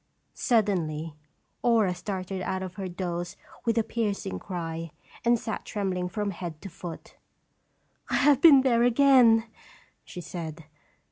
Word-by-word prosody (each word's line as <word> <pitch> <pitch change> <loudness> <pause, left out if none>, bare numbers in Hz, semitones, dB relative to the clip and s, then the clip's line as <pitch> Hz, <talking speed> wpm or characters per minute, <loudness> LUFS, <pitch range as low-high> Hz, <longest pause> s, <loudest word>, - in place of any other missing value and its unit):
Suddenly 170 -9 0 0.5
Aura 225 -6 +3
started 185 0 -5
out 190 0 -2
of 185 -1 -6
her 190 0 -5
doze 175 -1 -4 0.3
with 230 -1 +1
a 225 - +3
piercing 205 - -3
cry, 165 - -5 0.3
and 235 0 +4
sat 220 -1 -5
trembling 185 -3 -2
from 205 +3 -2
head 170 -4 -7
to 195 - -6
foot. 175 -1 -9 0.9
"I - - 0
have 280 0 +4
been 290 -5 +9
there 240 -3 +3
again," 245 -2 +5 0.6
she - - -9
said. 165 -2 -7
190 Hz, 135 wpm, -27 LUFS, 175-230 Hz, 0.9 s, been